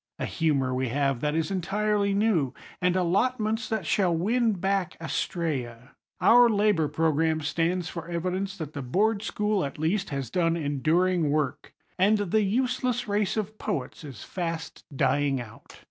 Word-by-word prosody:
A - - -2
humour 140 -5 0
we 130 +1 -1
have, 135 0 0
that 150 0 0
is 165 +3 -1
entirely 200 +2 0
new; 195 - +1 0.3
and 180 0 +2
allotments 215 +5 0
that 220 -6 -2
shall 185 +2 +2
win 225 +6 +1
back 195 -1 -1
Astræa. 135 -7 -3 0.3
Our 240 +1 +6
Labor 205 -7 +2
Program 160 +1 +1
stands 170 +3 0
for 165 -1 -6
evidence 185 +3 -2
that 155 -3 -6
the 140 - -4
Board 200 - +1
School, 210 -2 0
at 140 - -5
least, 185 +6 0
has 135 -4 -4
done 170 -2 +1
enduring 160 +3 +1
work; 145 -2 -2 0.2
and 205 +3 +4
the 205 +1 +1
useless 250 +3 0
race 205 +1 0
of 215 0 -3
poets 155 -7 -4
is 135 -7 -9
fast 165 -3 -5
dying 140 0 +2
out. 115 -2 -11
175 Hz, 155 wpm, -27 LUFS, 150-205 Hz, 0.3 s, Our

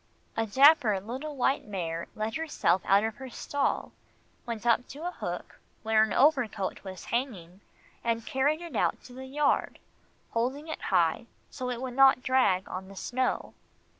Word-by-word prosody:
A 225 0 0
dapper 260 -3 +5
little 260 +9 -6
white 270 +1 +1
mare 170 -4 -4
let 215 +1 -2
herself 260 - +1
out 200 +2 +4
of 220 +2 -2
her 265 -1 -8
stall, 285 +3 -2 0.6
went 230 -1 -5
up 240 +1 +3
to 295 +5 -8
a 355 - -1
hook - - -6 0.2
where 220 0 +4
an 220 -1 +2
overcoat 250 -9 +2
was 190 -2 -8
hanging, 205 -8 -3 0.4
and 230 -1 -1
carried 290 +5 +1
it 340 -7 -8
out - - 0
to 250 - -13
the 260 +1 -8
yard, 285 +1 +1 0.5
holding 260 +7 -1
it 315 - -5
high 175 +3 +1 0.2
so 255 -2 -4
it 245 0 -4
would 255 -1 -4
not 270 -1 +6
drag 250 -8 +2
on 190 +1 -6
the 195 - -12
snow. 255 +6 -2
240 Hz, 165 wpm, -29 LUFS, 205-270 Hz, 0.6 s, not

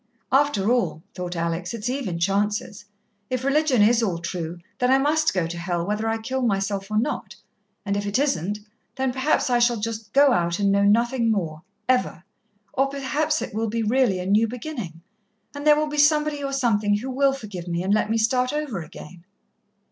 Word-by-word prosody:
"After 265 -7 +2
all," 235 -10 0
thought 180 -1 -5
Alex, 170 +5 -2
"it's 225 0 -4
even 250 -9 -2
chances. 205 +3 -1 0.4
If 255 0 -2
religion 275 -4 +3
is 230 +2 +4
all 190 -7 0
true, 170 0 -5 0.2
then 250 -1 +2
I 265 - +6
must 305 +3 +2
go 180 -3 0
to 170 +1 -5
hell, 170 -1 -2
whether 210 +3 -1
I 225 - 0
kill 260 +4 -3
myself 195 -3 -1
or 215 - -1
not, 245 +7 -2 0.5
and 200 -1 -1
if 205 0 -2
it 200 - +1
isn't, 210 - 0 0.3
then 265 -1 -1
perhaps 265 0 +1
I 245 - +4
shall 240 0 +3
just 215 -1 -5
go 280 +2 +5
out 170 -6 +1
and 200 -1 +2
know 200 0 +3
nothing 235 +3 +2
more 165 -8 -1 0.3
ever 250 -9 +1 0.5
or 270 -1 +2
perhaps 290 +3 -1
it - - -7
will 220 +1 -1
be 230 +1 -1
really 235 -3 +2
a 180 - -4
new 210 +4 +3
beginning, 230 - -6 0.5
and 290 +1 -5
there 300 - +8
will 305 - +1
be 300 0 -3
somebody 300 -1 +3
or 275 - -2
something 215 -6 +2
who 260 +5 -5
will 275 +1 +3
forgive 205 -9 -7
me, 170 0 -2
and 195 +2 +1
let 215 0 +1
me 225 - +1
start 250 +3 +1
over 295 - -3
again." 165 +2 -11
225 Hz, 200 wpm, -24 LUFS, 195-265 Hz, 0.5 s, there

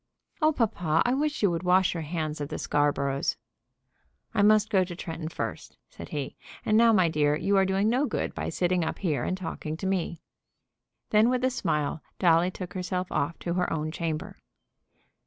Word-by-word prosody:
"Oh, 310 0 +5
papa, 180 - +1
I 245 - +2
wish 295 -1 -1
you 200 - +4
would 165 -1 -2
wash 185 0 +3
your 170 - -3
hands 155 -1 -3
of 145 - -3
the 155 - -4
Scarboroughs." 140 -1 0 1.0
"I - - +2
must 215 +1 +4
go 190 -2 +4
to 180 -1 -6
Tretton 165 -2 -5
first," - - -5
said - - -10
he. 145 -3 -4 0.3
"And 215 - +2
now, 230 +1 +6
my 185 -5 +4
dear, 150 -2 +2
you 200 +6 +1
are 195 0 +4
doing 195 +2 +1
no 255 +6 +2
good - - -2
by - - -3
sitting 180 -1 +1
up 160 - -3
here 160 -7 -1
and 185 - -1
talking 160 -3 -5
to 190 - -6
me." 180 -3 -1 0.9
Then, 215 +2 +5
with 250 0 0
a 260 - +3
smile, 155 - -1 0.2
Dolly 170 0 +4
took 185 -1 -7
herself 185 -1 -3
off 145 +4 -1
to 170 - -2
her 180 0 0
own 155 -1 -2
chamber. 160 -2 -4
180 Hz, 195 wpm, -27 LUFS, 160-200 Hz, 1.0 s, now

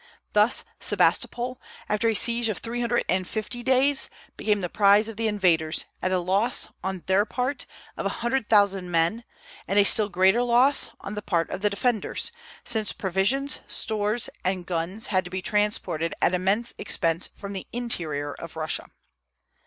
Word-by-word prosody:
Thus 210 +3 +4 0.2
Sebastopol, 250 +1 +1 0.3
after 210 +2 +1
a 225 - 0
siege 235 +1 +2
of 210 - -2
three 235 +1 -4
hundred 240 0 0
and 185 0 0
fifty 220 +3 -4
days, 265 +3 +2 0.3
became 210 -2 0
the 180 - -1
prize 205 +3 +4
of 225 - -4
the 225 +1 0
invaders, 175 -7 +2 0.2
at 185 - 0
a 185 - +2
loss, 195 +7 +1
on 190 -1 -4
their 190 +2 +3
part, 255 +5 -3 0.3
of - - -2
a - - -4
hundred 240 -2 0
thousand 195 -4 +3
men, 170 +7 +1 0.4
and 195 - 0
a 205 - +7
still 210 0 +4
greater 190 +5 +3
loss 245 +3 +3
on 195 - -6
the 210 - -4
part 170 -4 -1
of 190 - -4
the 210 - +3
defenders, 220 - -1 0.3
since 220 -3 0
provisions, 200 +10 0
stores, 215 +2 0 0.2
and 185 -1 -1
guns 180 +5 -3
had 185 0 +3
to 180 - -9
be 185 +1 -3
transported 195 -5 -1
at - - +2
immense 195 +6 0
expense 165 0 0
from 200 0 -9
the 190 - -6
interior 160 -12 -2
of 170 -1 -10
Russia. 155 -1 -2
205 Hz, 170 wpm, -25 LUFS, 185-235 Hz, 0.4 s, a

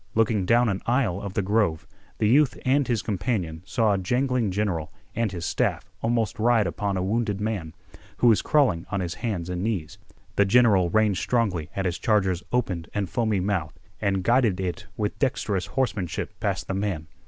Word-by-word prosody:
Looking 110 -4 +2
down 120 +1 +4
an 95 -3 -1
aisle 115 -7 +1
of 100 -2 -6
the 100 - +1
grove, 100 -5 +1 0.3
the 105 - +2
youth 135 +4 +4
and 135 +1 +3
his 115 -3 0
companion 95 -6 -2
saw 105 +1 +2
a 100 - 0
jangling 125 +3 0
general 95 -5 -1 0.2
and 115 -3 0
his 85 -3 -5
staff - - -1
almost 115 -2 0
ride 115 -1 +3
upon 100 +3 -2
a 90 - -1
wounded 105 0 0
man, 105 -7 -3 0.4
who - - +1
was 115 -3 +6
crawling 130 - +2
on 100 - -1
his 90 -2 -2
hands 100 -8 -3
and 90 -1 -3
knees. 95 -8 -3 0.4
The 100 - +5
general 100 -4 +4
reined 105 0 +2
strongly 100 -10 0
at 95 - -1
his 90 -2 -1
charger's 95 -5 +1
opened 95 -9 -1
and 100 -3 -2
foamy 110 -5 +1
mouth 90 -5 -2 0.2
and 95 -3 0
guided 115 -4 +3
it 90 -3 -3
with 105 -1 -2
dexterous 105 -8 0
horsemanship 110 -10 -2
past - - -2
the - - -2
man. 95 -5 -2
105 Hz, 185 wpm, -25 LUFS, 90-115 Hz, 0.4 s, was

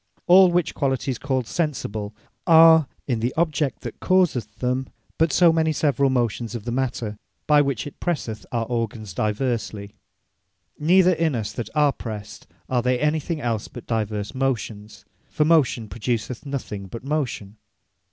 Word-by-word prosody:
All 185 +1 +7
which 175 -1 0
qualities 135 -2 -1
called 130 -3 -1
Sensible, 110 - -3 0.3
are 160 -2 +7 0.2
in 120 -5 -1
the 120 +3 -2
object 155 -4 0
that - - -7
causeth 160 - +1
them, 125 +4 -1 0.3
but 160 -1 +3
so 170 +2 +5
many 160 -1 +2
several 140 -2 +1
motions 120 -2 -1
of 110 - -6
the 120 - -3
matter, 115 -4 -2 0.3
by 150 -1 +5
which 140 -6 -1
it 145 - -10
presseth 120 - -3
our 115 -2 -1
organs 110 -4 -3
diversly. 105 -1 -2 0.9
Neither 180 +4 +5
in 160 -4 0
us 110 -3 -3
that 120 - -5
are 150 -2 +4
pressed, 110 -2 -8 0.2
are 125 -2 +1
they 125 +1 +1
anything 150 +2 -1
els, 115 -4 -2
but 120 - -11
divers 105 -2 -2
motions; 115 -6 -3 0.2
(for 150 - +1
motion, 150 -8 +3
produceth 120 +4 -3
nothing 105 -8 -5
but 115 +6 -8
motion.) 130 -8 -3
130 Hz, 150 wpm, -23 LUFS, 110-150 Hz, 0.9 s, All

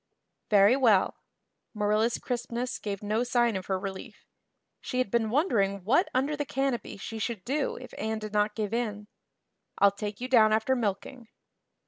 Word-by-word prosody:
"Very 205 +3 +6
well." 225 -8 +3 0.6
Marilla's 215 +2 +1
crispness 245 0 -3
gave 200 -1 -5
no 215 +3 0
sign 240 -2 +1
of 190 -1 -5
her 190 - 0
relief. 190 0 -8 0.5
She 255 - -5
had 255 -6 0
been 230 -2 +1
wondering 205 - +1
what 270 - +3
under 275 +4 0
the 295 - -2
canopy 270 -4 -2
she 220 +2 -6
should 215 -3 -4
do 280 +3 -1
if 255 - -10
Anne 220 +1 -2
did 215 -1 -7
not 210 0 +1
give 215 -1 -3
in. 210 -3 -3 0.7
"I'll 200 0 +5
take 205 0 -6
you 250 - -4
down 220 -4 +5
after 220 +4 +2
milking." 230 +2 -3
220 Hz, 165 wpm, -28 LUFS, 205-250 Hz, 0.7 s, Very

